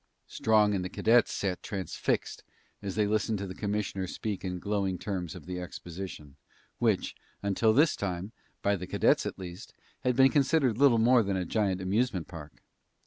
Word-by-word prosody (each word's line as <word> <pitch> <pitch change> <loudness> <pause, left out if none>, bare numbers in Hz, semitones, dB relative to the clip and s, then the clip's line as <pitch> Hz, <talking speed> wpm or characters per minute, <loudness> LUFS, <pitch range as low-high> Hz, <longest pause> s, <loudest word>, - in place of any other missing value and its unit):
Strong 105 -2 +3
and 95 -2 -1
the 90 - -4
cadets 115 +5 +3
sat 95 -2 -2
transfixed 95 -5 -2 0.4
as 100 -2 -4
they 105 0 +2
listened 105 +1 0
to 100 - -4
the 90 - -6
commissioner 100 -2 -2
speak 105 +2 -4
in 90 -1 -3
glowing 95 0 -1
terms 90 -3 -4
of 90 - -10
the 90 0 -4
exposition, 85 -4 -8 0.4
which, - - +1 0.3
until 100 +3 +3
this 150 +8 +4
time, 95 +1 -4 0.3
by 100 0 +3
the 90 -1 -6
cadets - - +2
at - - -5
least, 90 +3 -9 0.2
had 125 -1 0
been 135 +1 +6
considered 135 -5 +2
little 140 -4 +6
more 120 +2 +5
than 100 -3 -1
a 90 - -2
giant 95 -1 0
amusement 95 -1 0
park. 75 -4 -11
100 Hz, 175 wpm, -29 LUFS, 90-110 Hz, 0.4 s, been